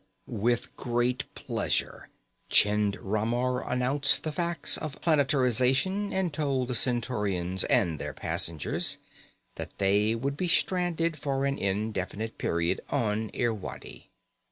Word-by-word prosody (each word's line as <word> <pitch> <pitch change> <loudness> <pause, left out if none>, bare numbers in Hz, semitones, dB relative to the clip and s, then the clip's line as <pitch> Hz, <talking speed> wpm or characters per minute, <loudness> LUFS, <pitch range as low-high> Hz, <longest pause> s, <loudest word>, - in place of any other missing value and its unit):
With 120 +3 -1
great 120 0 0 0.2
relish, - - +1 0.7
Chind 105 -1 +4
Ramar 120 +5 -1
announced 130 +3 +2
the 155 - -2
facts 170 +1 +1
of 150 -2 -6
planetarization 140 - +2
and 190 -4 -1
told 135 -4 -1
the - - -1
Centaurians 105 -7 0
and 85 - +2
their - - -5
passengers 80 -3 -1 0.6
that - - -7
they 100 +3 +3
would 140 +4 -2
be 180 - 0
stranded 170 -2 +1
for 135 -1 -1
an 140 0 -1
indefinite 105 +2 -2
period 85 0 0
on 110 -1 0
Irwadi. 115 -6 -4
125 Hz, 115 wpm, -28 LUFS, 105-145 Hz, 0.7 s, Chind